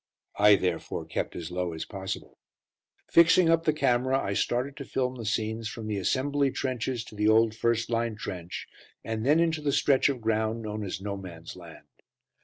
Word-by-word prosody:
I 105 0 +8
therefore 90 -4 -2
kept - - -3
as 85 0 -6
low 90 -1 -2
as 80 - -5
possible. 95 -2 -6 0.7
Fixing 170 +1 +6
up 165 0 +2
the 155 - +4
camera, 130 -2 +2
I 100 - -2
started 125 +7 -1
to 140 - -5
film 130 -1 -1
the 115 -4 -6
scenes 110 +1 -1
from 110 +1 -7
the 105 -1 -2
assembly 140 +7 +1
trenches 130 -2 -2
to 105 - -13
the 105 0 +1
old 110 0 +4
first 115 +1 0
line 115 -1 0
trench, 90 -4 -6 0.4
and 110 -1 -3
then 150 +6 +4
into 165 -2 +1
the 145 -1 0
stretch 140 0 +3
of 135 -3 -2
ground 110 0 0
known 105 0 -4
as 95 -1 -4
"No 100 0 -4
Man's 85 -4 -9
Land." 85 -3 -13
115 Hz, 190 wpm, -28 LUFS, 100-130 Hz, 0.7 s, I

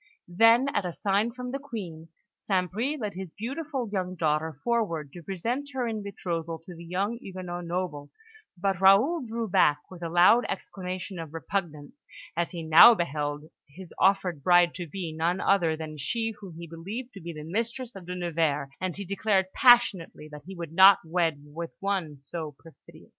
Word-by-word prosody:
Then, 225 +8 +5
at - - +1
a 180 -2 -4
sign 205 +5 0
from 250 +1 -6
the 275 - -3
Queen, 190 - -7 0.3
St. 185 -3 -1
Bris 260 +10 -2
led 210 -4 -3
his 185 -1 -7
beautiful 265 - -4
young 185 -3 -3
daughter 155 -2 0
forward 185 - -1
to 175 - -9
present 230 - -3
her 255 -2 -1
in 220 -2 -3
betrothal 170 -5 -4
to 180 - -9
the 170 0 -11
young 195 +7 -2
Huguenot 180 -4 -6
noble; 170 -5 -4 0.5
but 190 0 -1
Raoul 220 - +5
drew 230 -1 -3
back 150 -6 +4
with 180 -2 -11
a 170 - -3
loud 180 +8 +6
exclamation 185 -1 -5
of 165 -1 -8
repugnance, 165 -4 -4 0.3
as 170 0 0
he 170 -2 -6
now 160 +9 +9
beheld 150 -4 -2 0.3
his 180 +5 -12
offered 190 -5 +2
bride 175 +2 +5
to 175 -2 -6
be 165 0 -5
none 170 +3 0
other 170 -6 +2
than 155 -1 -7
she 225 +9 -2
whom 190 -5 -10
he 170 - -7
believed 195 +10 -7
to 195 - -10
be 170 +1 -6
the 155 -2 -8
mistress 230 +8 -3
of 185 -3 -10
De 180 - -4
Nevers, 160 -5 -1
and 185 -1 -2
he 200 - -5
declared 195 0 0
passionately 225 - +4
that 150 0 -11
he 195 - -8
would 170 -3 -7
not 190 +2 +8
wed 160 -3 0
with 165 +3 -7
one 190 -7 -2
so 150 +2 -7
perfidious. 165 - -17
180 Hz, 185 wpm, -27 LUFS, 165-205 Hz, 0.5 s, now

